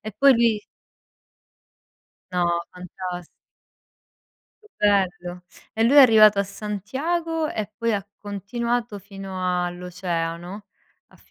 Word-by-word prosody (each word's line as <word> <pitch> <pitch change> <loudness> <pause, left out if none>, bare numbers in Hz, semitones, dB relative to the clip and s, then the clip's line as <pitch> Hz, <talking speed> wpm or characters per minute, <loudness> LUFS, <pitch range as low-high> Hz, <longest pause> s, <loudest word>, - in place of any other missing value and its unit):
E 215 - -7
poi 275 +4 +7
lui 230 -3 +1 1.7
No, 180 -1 +1 0.3
fantasti 180 -1 -7 1.3
Che 425 - -21
bello! 180 -3 0 0.3
E 225 - +1
lui 250 +5 +4
è - - +10
arrivato 215 -5 +7
a - - +3
Santiago 275 - -3
e 215 -7 -4
poi 230 -1 0
ha 200 -2 -2
continuato 230 +3 -3
fino 190 -3 -3
all'oceano 175 +1 -4 0.4
a - - -22
200 Hz, 105 wpm, -23 LUFS, 180-230 Hz, 1.7 s, è